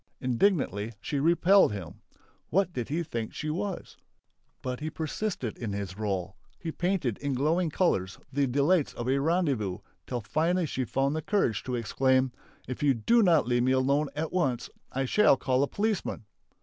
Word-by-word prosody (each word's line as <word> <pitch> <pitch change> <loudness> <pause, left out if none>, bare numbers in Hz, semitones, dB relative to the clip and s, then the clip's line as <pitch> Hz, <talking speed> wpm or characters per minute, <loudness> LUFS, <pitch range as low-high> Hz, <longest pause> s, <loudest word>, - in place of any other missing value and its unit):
Indignantly 125 - +1
she 140 +6 -2
repelled 170 - +5
him. 90 -5 -8 0.5
What 185 +1 +1
did 125 0 -4
he 165 +4 -1
think 115 -7 -5
she 155 -1 -3
was! 190 +3 -4 0.7
But 125 -1 -3
he 155 - -3
persisted 160 - -3
in 110 -4 -3
his 100 -2 -4
role; 95 -2 -3 0.2
he 165 - -5
painted 175 - -1
in 140 -2 -2
glowing 160 +6 +1
colours 100 - 0 0.2
the 140 0 +2
delights 145 +5 +2
of 120 - -5
a 135 +1 +2
rendezvous, 140 - 0 0.3
till 125 -2 -3
finally 170 - +1
she 130 -4 -2
found 135 +4 0
the 160 - -1
courage 150 - +1
to 125 - -2
exclaim: 130 +2 +2 0.4
"If 130 +3 -5
you 140 -3 +3
do 230 - +3
not 170 - +4
leave 120 0 +2
me 130 +2 +3
at 140 +3 0
once, 135 -10 -1 0.2
I 135 +1 -1
shall 210 +1 +4
call 130 0 +1
a 140 - +2
policeman!" 205 - -2
140 Hz, 170 wpm, -28 LUFS, 120-170 Hz, 0.7 s, repelled